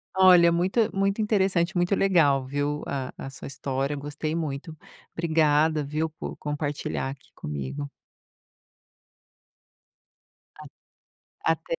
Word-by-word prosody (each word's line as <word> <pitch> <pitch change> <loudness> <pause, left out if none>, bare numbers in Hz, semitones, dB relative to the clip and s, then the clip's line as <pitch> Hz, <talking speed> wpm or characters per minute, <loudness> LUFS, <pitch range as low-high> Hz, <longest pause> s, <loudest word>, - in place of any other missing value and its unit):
Olha, 180 -2 +7
muito 190 +5 +1
muito 195 +2 +1
interessante, 190 -4 +1
muito 175 +3 +2
legal, 150 -10 +3
viu, 145 +2 -2
a 135 -2 -3
a 135 - -6
sua - - -9
história. 135 +1 -2
Gostei 145 +2 -4
muito. 155 0 -4 0.3
Obrigada, 155 -2 +2
viu, 155 +3 -1
por 155 - -8
compartilhar 145 -2 -3
aqui 135 - -11
comigo. 75 - -5 2.7
A - - -9 0.9
até! - - -4
155 Hz, 105 wpm, -26 LUFS, 140-175 Hz, 2.7 s, Olha